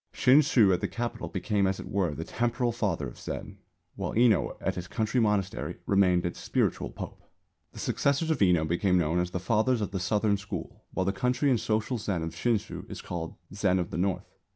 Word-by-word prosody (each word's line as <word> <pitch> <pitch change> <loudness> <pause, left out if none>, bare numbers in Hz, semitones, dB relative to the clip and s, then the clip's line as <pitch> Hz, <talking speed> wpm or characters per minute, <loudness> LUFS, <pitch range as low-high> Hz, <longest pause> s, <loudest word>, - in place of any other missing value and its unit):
Shinshū 130 -7 +5
at 90 - 0
the 100 - 0
Capital 115 +5 -4
became 100 +1 0
as 95 0 -1
it - - -7
were 95 -6 0
the 80 - -4
Temporal 120 +5 0
Father 105 -11 -1
of - - -11
Zen, - - -6 0.4
while - - -3
Enō 115 -4 +3
at - - -1
his 90 0 -6
country 110 +4 0
monastery 105 -4 0
remained 90 -3 +3
its 85 - -3
spiritual - - 0
pope. - - -8 0.5
The - - -14
successors 140 +4 +1
of 155 - 0
Enō 90 -5 +4
became 90 +3 +2
known 85 0 +1
as 90 0 0
the 90 - -3
Fathers 110 +6 +2
of 105 -2 -2
the 95 - -2
Southern 100 +3 +1
School; 100 -5 -7
while 95 - -1
the 95 - +1
courtly 125 +7 +1
and 120 - +3
social 110 +3 -1
Zen 95 -6 -2
of 80 - -3
Shinshū 115 -4 -2
is - - -7
called 85 -2 -5 0.2
Zen 100 -2 +2
of 90 -2 -2
the - - -3
North. 95 0 0
100 Hz, 205 wpm, -28 LUFS, 90-115 Hz, 0.5 s, Shinshū